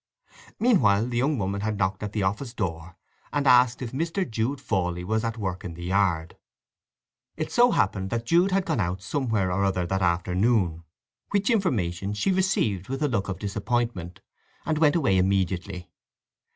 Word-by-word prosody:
Meanwhile 115 - +4
the 120 - -2
young 140 +3 +1
woman 100 -1 -2
had 105 0 -2
knocked 95 -1 -1
at 105 -1 -4
the 105 -2 -1
office 115 +6 -2
door 85 -4 -4 0.4
and 145 -1 -1
asked 125 -1 +5
if 120 - -5
Mr. 165 +6 -2
Jude 115 +5 -2
Fawley 90 -3 -1
was 110 +4 -1
at 115 0 -2
work 95 -4 -4
in 85 -2 -6
the 85 - -8
yard. 90 -3 0 1.0
It 155 -1 -3
so 245 +1 +5
happened 95 - 0
that 115 +1 -2
Jude 170 +9 +3
had 190 0 +1
gone 160 -9 -1
out 95 0 -2
somewhere 110 -5 -1
or 95 +2 0
other 95 -2 0
that 95 +2 -1
afternoon, 90 0 +1 0.4
which 200 +4 +1
information 105 - 0
she 110 - +1
received 155 - 0
with 135 +3 -2
a - - +3
look 105 -7 -1
of 95 - -3
disappointment, 105 -2 -3 0.4
and 155 -1 0
went 155 -1 +4
away 100 - +3
immediately. 95 -1 -1
105 Hz, 175 wpm, -26 LUFS, 95-135 Hz, 1.0 s, asked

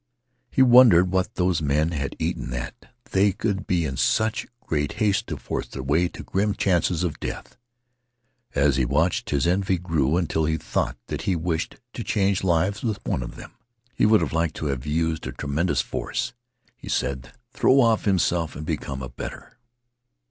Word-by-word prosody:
He 130 - +4
wondered 120 -8 +7
what 95 -1 0
those 90 -3 +1
men 75 +3 +1
had 70 -4 -3
eaten - - -2
that 60 0 -6 0.2
they 100 +1 +4
could 100 0 -2
be 85 -3 +1
in 65 -3 -4
such 110 - +1 0.2
haste 80 +7 0
to - - -4
force - - -4
their 65 +2 -7
way 80 +6 +2
to - - -9
grim 100 +1 0
chances 90 -2 +1
of 85 -4 -2
death. - - -6 1.0
As 70 0 +3
he 65 - +2
watched 75 +8 +1
his 70 -2 +1
envy 95 +1 +1
grew 80 -3 +1
until 80 -3 0
he 80 +1 0
thought - - -2
that - - -4
he 95 - +2
wished 85 0 -2 0.2
to 115 - -5
change 100 -3 +1
lives 95 +3 +1
with 110 -4 -1
one - - -1
of - - -7
them. - - -10 0.4
He - - +3
would 110 -3 +5
have 80 - -2
liked 85 -1 0
to - - -5
have 65 +2 -7
used 80 +1 -1
a - - -4
tremendous 75 +5 0
force, 120 0 -3 0.4
he - - -11
said, 65 -3 -2 0.2
throw 135 +1 +4
off 115 -4 +3
himself 85 -5 +1
and 75 - -6
become 70 -4 -4
a 65 - -5
better. - - -9
85 Hz, 180 wpm, -24 LUFS, 75-95 Hz, 1.0 s, wondered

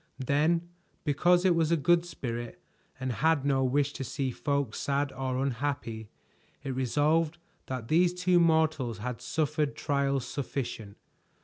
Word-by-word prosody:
Then, 160 +5 +2 0.4
because 175 +5 +3
it 185 - +5
was 165 -1 +1
a 170 - +4
good 175 +4 +3
spirit, 120 -7 -5 0.4
and 130 0 -2
had 155 +3 +2
no 135 -2 +2
wish 140 +2 +1
to - - -5
see 130 +1 -2
folk 140 -3 -1
sad 140 +2 -1
or 130 -1 -3
unhappy, 120 -4 -3 0.5
it 135 -2 -3
resolved 150 +6 +1 0.3
that 130 -4 -4
these 175 +4 +4
two 180 0 +2
mortals 160 -8 +2
had 125 +2 -5
suffered 150 -1 -1
trials 140 -2 0
sufficient. 125 -7 -4
140 Hz, 140 wpm, -29 LUFS, 130-160 Hz, 0.5 s, it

